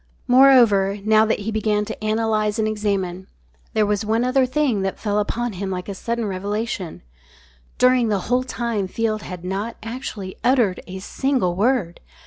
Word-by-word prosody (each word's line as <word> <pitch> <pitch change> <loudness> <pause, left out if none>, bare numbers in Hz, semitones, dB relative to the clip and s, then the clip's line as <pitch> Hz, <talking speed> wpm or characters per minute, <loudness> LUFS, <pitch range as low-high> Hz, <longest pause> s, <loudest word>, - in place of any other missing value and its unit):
Moreover, 240 -7 +5
now 215 0 +5
that 215 - 0
he 220 +2 -3
began 210 -1 0
to 220 0 -7
analyse 215 -1 0
and 220 -1 +1
examine, 195 -4 -2 0.5
there 215 -1 +3
was 205 0 0
one 220 +2 +1
other 255 +1 +2
thing 255 -6 +1
that 195 0 -2
fell 210 -1 -1
upon 240 +2 -2
him 195 +1 -4
like 180 -1 -4
a 200 - -4
sudden 230 +4 -3
revelation: 200 - -4 0.7
_During 250 -2 +4
the 200 -3 0
whole 250 +5 +1
time 235 -5 -2
Field 215 +2 -1
had 180 -3 -8
not 200 +5 -3
actually 225 -5 -6
uttered 240 -7 +2
a 190 0 -7
single 235 -1 -1
word! 210 -4 0
215 Hz, 165 wpm, -22 LUFS, 195-235 Hz, 0.7 s, Moreover